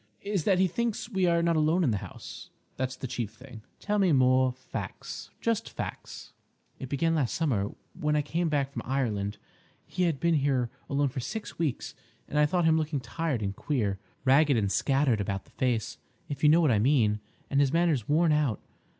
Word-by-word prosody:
"—is 200 -5 -1
that 190 -3 +4
he 190 - +4
thinks 225 +4 -2
we 190 -3 +2
are 170 -1 +3
not 170 -1 +2
alone 160 +4 +3
in 135 - +2
the 105 - 0
house. - - -10 0.3
That's 130 0 -2
the - - -7
chief 120 -4 -4
thing." 125 -2 -12 0.2
"Tell 210 0 0
me 190 -3 +4
more 130 -1 +4
facts—just 215 - -5
facts." - - -7 0.5
"It 130 - -6
began 165 +4 +1
last 145 -7 0
summer 115 -12 0 0.2
when 150 0 0
I 150 - +2
came 165 +3 -1
back 140 -2 0
from 120 - -5
Ireland; 110 -6 -1 0.5
he 180 0 -1
had 160 -5 0
been 170 0 +2
here 135 -5 +1 0.2
alone 140 0 +1
for 130 - -5
six 200 - -6
weeks, 155 -7 -2 0.3
and 150 - 0
I 150 - +5
thought 175 +2 +1
him 160 0 +4
looking 155 -2 -1
tired 130 -1 -2
and 100 0 -2
queer—ragged 130 +5 +1
and 100 -3 0
scattered 135 -5 +2
about 100 -1 -3
the - - -23
face, 120 -3 -1 0.3
if 145 -1 -5
you 150 - +7
know 165 +3 +6
what 155 -5 +4
I 105 - +3
mean, 110 -4 +3 0.3
and 140 - +3
his 140 -2 +3
manner 170 -1 +3
worn 160 +2 +3
out. 150 -8 +1
140 Hz, 195 wpm, -28 LUFS, 125-165 Hz, 0.5 s, you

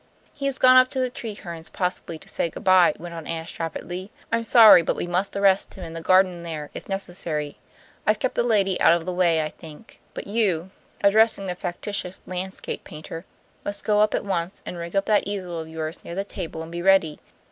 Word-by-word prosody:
"He 275 - -3
has 270 -1 -1
gone 255 0 +7
up 255 0 +7
to 265 - -4
the 255 -1 0
Trehernes 175 -9 -7
possibly 180 -3 -3
to - - -17
say 170 - -1
good - - -10
by," 185 -4 +5
went 170 +1 -8
on 165 -2 -8
Ashe 165 0 -5
rapidly. 175 +3 -5 0.2
"I'm 230 0 +1
sorry, 225 -5 +8
but - - -1
we - - -3
must 180 +3 -1
arrest 200 -1 +2
him 190 - -9
in 165 -1 -8
the 165 - -6
garden 185 0 +3
there, 155 -3 -6
if - - -9
necessary. 175 -6 -3 0.5
I've 215 0 +4
kept 260 - -1
the - - +1
lady 200 -6 +1
out - - +7
of 170 -1 -4
the 185 - -3
way, 170 -3 +2
I 155 - -3
think. 160 +8 -14 0.2
But - - -6
you" 190 -5 0 0.3
addressing 210 0 +4
the 180 - -2
factitious 180 +1 -4
landscape 185 +1 -5
painter 165 +1 -9 0.4
"must 205 0 -4
go 210 -1 +2
up 210 0 +3
at - - -2
once 185 -1 -3
and - - -6
rig 170 +2 -6
up 195 0 +2
that 210 -2 +2
easel 185 -4 -4
of 160 0 -7
yours 160 0 -5
near 170 - -7
the 195 - -1
table 165 -4 -6
and 165 - -10
be 170 0 -4
ready. 185 -5 +3
185 Hz, 220 wpm, -24 LUFS, 165-200 Hz, 0.5 s, sorry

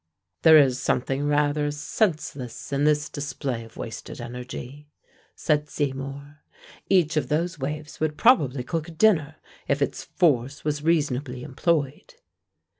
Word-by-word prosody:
"There 160 -1 +8
is 135 -3 +4
something 135 +3 0
rather 145 0 +1
senseless 150 - -2
in 140 +1 +1
this 150 0 +2
display 135 -4 -4
of 115 - -15
wasted 115 - -7
energy," 125 +4 -8 0.5
said 150 -1 0
Seymour. 140 +1 -4 0.5
"Each 170 -5 +3
of 130 -4 0
those 165 +2 -1
waves 150 +2 -5
would 155 -1 -1
probably 140 - +4
cook 160 +4 -3
a - - -8
dinner, 160 -5 +3 0.3
if 140 0 +1
its 140 - -1
force 140 -6 +1
was 150 -1 -1
reasonably 145 -5 0
employed." 145 0 -1
145 Hz, 130 wpm, -25 LUFS, 135-155 Hz, 0.5 s, There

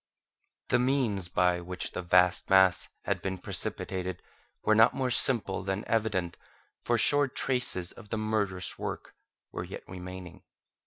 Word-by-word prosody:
The - - +3
means 125 -8 0
by 90 0 +1
which 90 +1 -4
the - - -4
vast 90 0 +3
mass 95 -2 +5
had - - -1
been 95 -1 -3
precipitated 90 0 -3 0.4
were 110 - +3
not 110 +2 +5
more 130 -2 -1
simple 115 -6 +1
than 95 +2 -3
evident, 105 -6 -1 0.5
for 120 - +1
sure 145 +4 +4
traces 125 -9 0
of 105 -3 -14
the 110 - -2
murderous 105 -4 -1
work - - -5 0.4
were - - -5
yet - - -8
remaining. 90 -1 -9
95 Hz, 145 wpm, -29 LUFS, 90-115 Hz, 0.5 s, mass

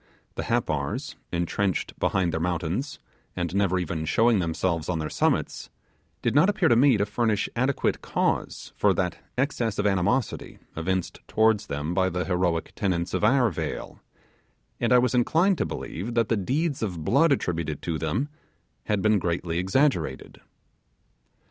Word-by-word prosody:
The - - -4
Happars, - - -1 0.2
entrenched 90 +3 -1
behind 90 -4 +1
their 80 - -1
mountains, 90 - -2 0.4
and 85 -1 -2
never 100 -2 +2
even 80 -3 -2
showing 110 +7 +3
themselves 85 -1 -1
on 90 - 0
their 80 -1 -3
summits, - - 0 0.5
did - - +1
not 150 +8 +5
appear 200 -6 +2
to 120 - +5
me 130 0 +5
to 100 - +1
furnish 105 0 0
adequate 130 +3 0
cause - - -2
for - - +3
that - - -1 0.2
excess 125 -5 0
of 105 - 0
animosity 100 +5 0 0.2
evinced 90 +2 -2
towards 110 -1 +2
them 75 +4 -3
by 95 0 +2
the 90 0 -2
heroic 90 -3 0
tenants 90 -4 -1
of - - -1
our 125 0 +4
vale, 80 - -5 0.8
and - - 0
I 125 - +7
was 125 -1 +2
inclined 165 +10 +3
to - - 0
believe 110 +8 -5
that 115 -2 +2
the 115 - +3
deeds 140 - -1
of 90 -8 -3
blood 145 - +4
attributed 85 - -1
to 80 -3 -2
them 95 - -1 0.6
had 105 -2 0
been 110 -1 +4
greatly 85 -1 -1
exaggerated. 130 +11 0
100 Hz, 155 wpm, -26 LUFS, 85-120 Hz, 0.8 s, I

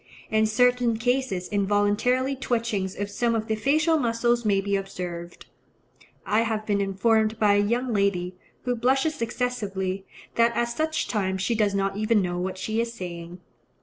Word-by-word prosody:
In 220 0 +3
certain 245 +1 +3
cases 245 -6 0
involuntary 205 +6 +1
twitchings 230 -7 -1
of 205 - -1
some 230 +2 +1
of 220 -1 -1
the 220 - -1
facial 310 +8 +2
muscles 235 -1 +1
may 205 -3 +2
be 200 +1 0
observed. 180 -3 -5 0.8
I 215 +2 +2
have 220 -2 -1
been 205 -1 +1
informed 215 +3 +2
by 210 -2 +4
a 205 - +4
young 240 +4 0
lady, 190 -3 0 0.3
who 245 -1 0
blushes 265 +5 +1
excessively, 205 -6 -2 0.3
that 235 0 +4
at 235 0 +1
such 315 +6 -1
times 190 -3 -1
she 235 - +1
does 210 -3 +1
not 195 0 0
even 215 +1 +2
know 175 -2 -1
what 185 +1 -3
she 220 +4 -1
is 235 0 -3
saying. 175 -4 -8
215 Hz, 165 wpm, -25 LUFS, 195-240 Hz, 0.8 s, by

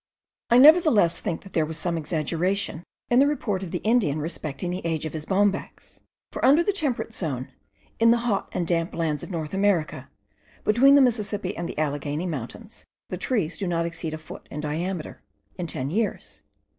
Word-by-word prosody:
I 240 - +6
nevertheless 280 - +6
think 170 -6 -4
that 195 - -14
there 160 - +2
was 155 0 -5
some 170 +1 -1
exaggeration 165 +3 -1 0.3
in 240 - +5
the 280 - +5
report 215 -10 -1
of 190 - -5
the 175 - -4
Indian 215 -10 +2
respecting 155 +1 -4
the 180 - -4
age 165 -2 -2
of 155 - -5
his 155 -1 -5
bombax; 200 0 -1 0.3
for - - -6
under 295 +6 +6
the 405 - +1
temperate 280 - -2
zone, 135 - -3 0.5
in 230 0 +5
the 235 - +5
hot 205 -5 0
and 175 - -2
damp 165 0 -1
lands 155 -4 -1
of - - -7
North 160 -3 -4
America, 190 -4 0 0.5
between 265 +6 +5
the 285 - +7
Mississippi 210 -6 0
and 170 - -4
the - - -7
Alleghany 145 +2 -2
mountains, 170 - -6 0.3
the - - -4
trees 200 - -1
do 195 - -2
not 170 -1 0
exceed 165 -2 -4
a - - -6
foot 155 - -11
in 150 - -6
diameter, 160 +3 -4 0.4
in 175 - -2
ten 135 -2 -4
years. 215 +3 -2
180 Hz, 190 wpm, -25 LUFS, 160-215 Hz, 0.5 s, the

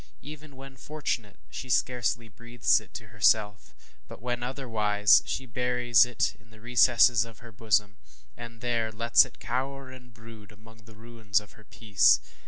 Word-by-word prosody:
Even 150 0 -12
when 135 0 -12
fortunate, 125 -9 -5 0.2
she 130 - -8
scarcely 120 -1 -1
breathes 115 +2 0
it - - -19
to - - -9
herself; 105 - 0 0.3
but - - -12
when 120 +1 -4
otherwise, 110 -5 +2
she 130 - -4
buries 125 0 +2
it 125 - -2
in 115 -1 -25
the 110 -1 -18
recesses 120 -1 +3
of 115 -2 -12
her 120 +3 -14
bosom, 105 -1 -1 0.4
and 115 -1 -11
there 115 -2 -2
lets 115 +2 +4
it - - -16
cower 130 +2 -5
and 125 -1 -15
brood 110 -2 -15
among 110 +1 -19
the 110 0 -16
ruins 110 -2 -3
of 105 - -16
her 110 -1 -20
peace. 105 -4 +2
115 Hz, 165 wpm, -27 LUFS, 110-125 Hz, 0.4 s, lets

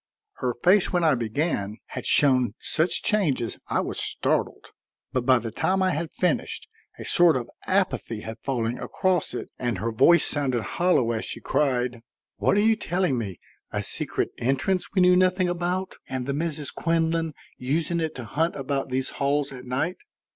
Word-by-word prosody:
Her 125 -2 -1
face, 180 +10 +3
when 175 -2 +1
I 155 -2 +5
began, 115 - -1
had - - -4
shown 130 -6 +4
such 165 +2 0
changes 150 - 0
I - - +1
was - - -3
startled; - - -1 0.4
but 130 -1 -1
by 130 -1 +6
the 115 -1 -4
time 190 - +1
I 185 - +2
had 165 0 -3
finished 180 - -1 0.3
a - - -8
sort 175 -2 +5
of 120 - -4 0.2
apathy 185 - 0
had 110 +1 -7
fallen 120 -3 -2
across 180 -8 0
it - - -6
and 120 -5 -1
her 115 +5 -2
voice 170 +10 +5
sounded 130 -6 -1
hollow 175 -9 +2
as 110 -1 -2
she - - -6
cried: 125 -4 0 0.4
"What 200 - +2
are - - +4
you 220 +1 +4
telling 175 - 0
me? 100 -6 -5 0.3
A - - -2
secret - - -1
entrance 135 +9 0
we 185 - +5
knew 180 0 +6
nothing 185 0 +3
about 175 +2 -2 0.2
and 130 -1 -3
the 140 - -1
Misses 150 -1 -3
Quinlan 165 -2 0 0.2
using 160 +6 0
it 160 -1 -2
to 125 - -6
hunt 160 +10 0
about 135 0 -2
these 130 +1 -2
halls 140 +1 +1
at 130 -1 -9
night! 130 +8 -1
145 Hz, 175 wpm, -25 LUFS, 125-175 Hz, 0.4 s, by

